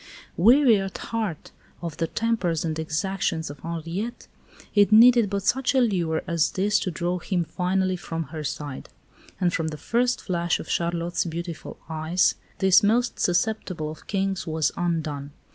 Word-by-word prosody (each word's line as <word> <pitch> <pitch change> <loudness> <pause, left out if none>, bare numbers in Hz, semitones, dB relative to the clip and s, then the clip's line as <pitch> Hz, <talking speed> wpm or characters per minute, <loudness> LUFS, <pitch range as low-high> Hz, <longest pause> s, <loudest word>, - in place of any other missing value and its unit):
Weary 235 +3 +6
at 195 0 -5
heart 215 -9 -4 0.3
of 165 -3 -5
the 165 - 0
tempers 190 -8 -1
and 160 -1 -2
exactions 160 -1 -2
of 145 - -12
Henriette, 170 +8 -5 0.5
it 205 0 +4
needed 235 0 +7
but 200 -1 -2
such 265 +5 +1
a - - +5
lure 175 -9 +1
as 170 -2 +1
this 205 +2 +2
to - - -2
draw 175 +2 -2
him 180 -1 -1
finally 185 +2 0
from 165 -1 -4
her 155 -1 -4
side; 145 -1 -5 0.5
and 180 -3 +1
from 160 - -1
the 155 -1 -5
first 245 - 0
flash 170 -2 -1
of - - -7
Charlotte's 170 +1 -1
beautiful 170 0 -6
eyes 160 +3 +1 0.2
this 190 -2 +5
most 235 +4 +1
susceptible 180 -4 0
of 155 - -13
Kings 195 -3 -1
was 160 -1 +1
undone. 155 -5 -2
175 Hz, 160 wpm, -25 LUFS, 160-205 Hz, 0.5 s, needed